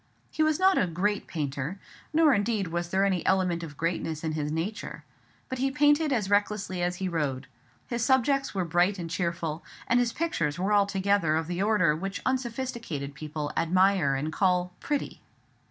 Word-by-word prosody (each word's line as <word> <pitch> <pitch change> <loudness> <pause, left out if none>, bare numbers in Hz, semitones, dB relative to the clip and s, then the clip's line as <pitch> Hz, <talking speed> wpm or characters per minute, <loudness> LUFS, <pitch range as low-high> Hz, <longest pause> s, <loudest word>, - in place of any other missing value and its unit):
He - - -2
was 310 -1 +3
not 375 0 +4
a 185 - +2
great 195 +5 -1
painter, 145 +3 -3 0.3
nor 310 -2 +5
indeed 205 -3 0
was 170 +1 -3
there 190 +2 +2
any 185 -4 0
element 180 -3 +1
of 155 -4 -8
greatness 165 -2 -2
in 160 - -1
his 150 -1 -2
nature; 170 +7 -4 0.4
but 260 - -5
he 270 +1 +2
painted 295 +2 +3
as 220 -7 +1
recklessly 205 -2 0
as 175 0 0
he 190 +1 -3
rode; 145 -6 -2 0.4
his 235 -1 -2
subjects 265 0 +2
were 185 -2 0
bright 175 +4 +2
and 170 -2 -6
cheerful; 170 -2 -2 0.2
and 240 - +3
his 240 -1 +1
pictures 165 - -1
were 190 +4 0
altogether 200 -4 +2
of 160 0 0
the 175 +2 -3
order 200 -7 +3
which 195 +4 -4
unsophisticated 235 - -3
people 150 0 -5
admire 185 -4 +3
and 150 +4 -3
call 180 0 +1
"pretty." 290 -1 -3
185 Hz, 175 wpm, -27 LUFS, 165-225 Hz, 0.4 s, nor